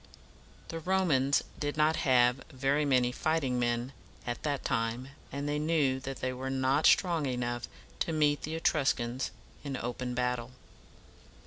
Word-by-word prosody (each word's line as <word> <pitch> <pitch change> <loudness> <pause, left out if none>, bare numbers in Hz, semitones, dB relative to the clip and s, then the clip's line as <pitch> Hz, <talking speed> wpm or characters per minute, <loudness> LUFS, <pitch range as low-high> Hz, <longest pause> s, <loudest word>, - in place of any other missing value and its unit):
The 165 - -4
Romans 160 -7 +2 0.2
did 145 0 -2
not 155 +1 +3
have 125 -1 +3
very 140 +2 +1
many 125 -3 +3
fighting 135 -3 0
men 120 +2 -1 0.3
at 120 -1 -3
that 145 -2 -2
time, 115 +3 -1 0.2
and 140 +1 -3
they 145 0 0
knew 150 -4 +1
that 135 0 -6
they 130 0 -1
were 130 +1 -4
not 135 +3 +2
strong 170 -6 +3
enough 120 -1 -2 0.3
to - - 0
meet 150 -2 +2
the 155 +2 -4
Etruscans 135 -6 0 0.3
in 140 -2 -3
open 125 +1 -4
battle. 125 0 -1
135 Hz, 145 wpm, -30 LUFS, 125-150 Hz, 0.3 s, not